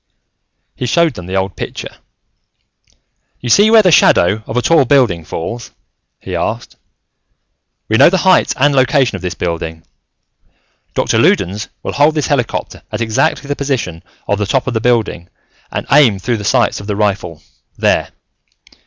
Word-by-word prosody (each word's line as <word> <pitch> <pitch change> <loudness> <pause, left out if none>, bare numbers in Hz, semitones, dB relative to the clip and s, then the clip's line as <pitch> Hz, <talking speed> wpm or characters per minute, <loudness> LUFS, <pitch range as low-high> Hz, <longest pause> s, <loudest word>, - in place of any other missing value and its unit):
He 125 - -4
showed 165 +4 +2
them 90 -5 -9
the 95 - -4
old 95 0 -2
picture. - - -7 1.4
"You 125 - -5
see 205 - +5
where 220 -1 +6
the 180 - +4
shadow 105 - +4
of 115 - -4
a - - +2
tall 165 -4 +4
building 120 - +2
falls?" 115 +10 -6 0.5
he - - -6
asked. - - -4 1.1
"We 110 - +1
know - - +7
the 190 - +1
height 185 - +3
and 145 +2 +3
location 130 -3 +2
of 95 - -7
this 90 -1 -4
building. 80 -2 -4 1.1
Doctor - - +1
Loudons 100 +4 +1 0.2
will - - -3
hold 150 +2 +3
this 150 - 0
helicopter 135 -5 -2
at - - -4
exactly 115 +5 0
the 145 - -2
position 115 - -3 0.3
of 100 - 0
the 105 - -1
top 130 +3 0
of 130 - -3
the 110 - -1
building 110 -8 0 0.4
and - - -4
aim 135 -8 +5
through 115 +5 -2
the 105 - -7
sights 120 +3 +1
of 100 - -10
the 105 - -2
rifle, 100 -6 -2 0.3
there. - - +1
115 Hz, 165 wpm, -15 LUFS, 95-140 Hz, 1.4 s, know